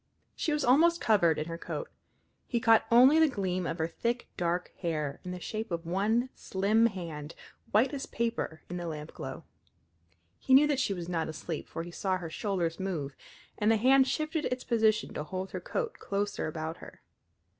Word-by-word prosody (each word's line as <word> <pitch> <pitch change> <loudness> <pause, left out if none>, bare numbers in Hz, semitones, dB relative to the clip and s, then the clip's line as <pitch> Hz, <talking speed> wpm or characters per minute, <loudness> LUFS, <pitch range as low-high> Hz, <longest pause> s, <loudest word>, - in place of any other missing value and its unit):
She 315 - -1
was 295 -1 0
almost 330 +7 +5
covered 175 -8 +3
in 155 - -2
her 165 0 -6
coat. - - -5 0.6
He 240 - 0
caught 225 -1 +4
only 255 +7 +7
the 320 - +6
gleam 185 -6 -2
of 165 - -3
her 160 -1 0
thick, 240 +7 -2
dark 175 +1 -1
hair, 155 -5 -2
and 180 - -5
the 180 - -5
shape 220 +5 -4
of 170 -1 -3
one 215 +8 +1
slim 210 +4 +2
hand, 165 -7 -6 0.3
white 245 +7 +3
as 280 -1 -4
paper 230 -9 -2
in 180 - -5
the 175 -1 -4
lampglow. 150 -2 -6 1.0
He 260 - +4
knew 285 +3 +8
that 290 -3 +1
she 205 -7 0
was 175 -2 -6
not 165 -3 -1
asleep, 160 0 -5
for 165 - -4
he 175 - -9
saw 185 +1 -1
her 170 -3 -7
shoulders 175 -3 -2
move, 160 -8 -3 0.4
and 210 - +3
the 225 - +4
hand 265 +4 +5
shifted 310 +1 -1
its 250 0 -2
position 220 -3 +2
to 150 - -3
hold 185 +5 -5
the 185 - -4
coat 465 - -3
closer 200 +1 -2
about 160 +1 -4
her. - - -13
195 Hz, 190 wpm, -30 LUFS, 170-240 Hz, 1.0 s, knew